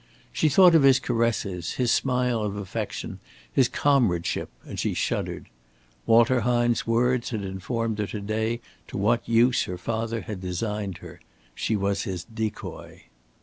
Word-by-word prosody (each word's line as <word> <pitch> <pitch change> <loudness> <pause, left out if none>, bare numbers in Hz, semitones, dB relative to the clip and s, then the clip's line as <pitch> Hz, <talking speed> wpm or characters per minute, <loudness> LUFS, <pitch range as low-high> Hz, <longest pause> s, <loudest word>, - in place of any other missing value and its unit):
She 155 - +2
thought 180 +4 +7
of 165 - +6
his 135 -1 +6
caresses, 115 -8 -1
his 125 -2 +1
smile 125 -3 +1
of 105 -1 -2
affection, 100 -3 -5 0.3
his 130 -2 +4
comradeship, 125 -13 +1 0.2
and - - -7
she - - -1
shuddered. - - -2 0.6
Walter 120 +2 +5
Hine's 120 +1 +1
words 120 +1 +2
had 110 -4 -3
informed 110 +4 -3
her 105 - -1
to 105 - -5
day 110 +3 -1 0.3
to - - -6
what 115 +5 +1
use 120 +2 +4
her 90 - -5
father 115 +4 -2
had 105 -4 -6
designed 100 +1 -3
her. 85 +1 -11 0.3
She 110 - -1
was 100 0 0
his 90 -3 -4
decoy. 110 +1 -6
115 Hz, 150 wpm, -25 LUFS, 100-120 Hz, 0.6 s, thought